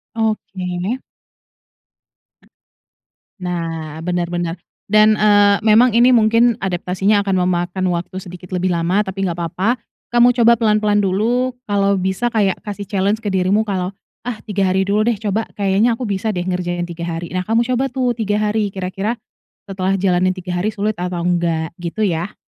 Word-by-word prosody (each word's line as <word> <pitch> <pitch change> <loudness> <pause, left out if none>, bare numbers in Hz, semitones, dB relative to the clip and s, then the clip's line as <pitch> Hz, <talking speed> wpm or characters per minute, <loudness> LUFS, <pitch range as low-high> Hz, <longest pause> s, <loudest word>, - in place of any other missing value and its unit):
Oke. 200 0 -2 2.4
Nah, 165 -3 -4
benar 175 0 -1
benar. 175 0 -3 0.3
Dan, 215 +1 +5
eee, 205 -1 +5
memang 225 +2 +5
ini 240 +2 +6
mungkin 230 0 +4
adaptasinya 190 +2 0
akan 190 -2 +1
memakan 180 +1 -1
waktu 175 +2 -4
sedikit 180 0 -11
lebih 185 0 0
lama. 170 +3 +1
Tapi, 195 +1 -4
nggak 175 -3 -2
papa, 190 +9 -1 0.3
kamu 240 0 +5
coba 235 +1 +6
pelan-pelan 210 -2 +2
dulu, 230 +6 0
kalau 200 -1 +2
bisa 190 +5 -1
kayak 205 -4 +1
kasih 205 -1 -5
challenge 200 +1 0
ke 205 - -1
dirimu 190 +3 +2
kalau, 190 -3 -3 0.3
"Ah, 240 -3 -4
3 200 -3 0
hari 190 0 +2
dulu 205 +2 +1
deh, 235 - +2
coba, 215 +1 -1
kayaknya, 205 +4 +2
aku 250 - -6
bisa 205 +2 -1
deh, 175 - -1
ngerjain 175 -1 -2
3 170 0 -5
hari." 170 0 -5
Nah, 185 0 -2
kamu 225 +3 +2
coba 255 +2 +1
tuh, 255 -1 -1
3 210 -2 0
hari, 210 -2 -1
kira-kira 195 +4 -3 0.5
setelah 190 0 -1
jalanin 185 -1 +2
3 180 -1 -5
hari, 210 +5 -1
sulit 210 +1 -2
atau 180 0 -3
enggak, 170 -2 0
gitu 175 +4 -5
ya. 175 0 -1
195 Hz, 160 wpm, -19 LUFS, 180-215 Hz, 2.4 s, ini